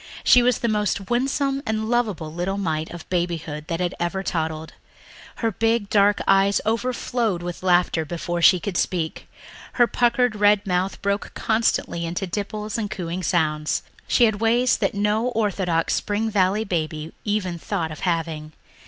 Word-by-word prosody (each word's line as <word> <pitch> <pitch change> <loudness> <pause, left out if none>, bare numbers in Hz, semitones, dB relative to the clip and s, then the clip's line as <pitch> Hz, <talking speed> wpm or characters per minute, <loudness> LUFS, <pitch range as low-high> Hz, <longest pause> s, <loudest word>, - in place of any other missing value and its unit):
She 250 - +6
was 245 -1 +3
the 235 - -1
most 210 -1 -1
winsome 270 +2 0
and 220 -3 -2
lovable 210 -10 -1
little 180 +3 -2
mite 160 -5 -2
of 175 -2 -9
babyhood 165 -4 -2
that 175 +1 -1
ever 175 +3 -2
toddled. 160 -3 -3 0.6
Her 225 -1 -1
big 225 0 0
dark 205 0 +4
eyes 195 +1 +4
overflowed 230 -4 -1
with 175 -1 -5
laughter 175 -3 +2
before 175 +2 -3
she 180 +1 +6
could 185 0 -3
speak, 165 -4 -2 0.4
her 240 - +5
puckered 240 -1 +2
red 205 0 +3
mouth 185 0 -1
broke 200 0 -1
constantly 220 -6 0
into 175 +4 -3
dimples 210 +4 -4
and 210 -2 -2
cooing 180 -2 -4
sounds. 155 -3 0 0.2
She 245 - +3
had 220 -2 +2
ways 240 +2 +3
that - - -1
no 210 +3 +1
orthodox 195 -8 0
Spring 215 +2 -1
Valley 200 +1 +2
baby 160 -5 -3
ever 205 -3 0
thought 165 0 -3
of 155 - -8
having. 160 -3 -2
195 Hz, 155 wpm, -23 LUFS, 170-220 Hz, 0.6 s, She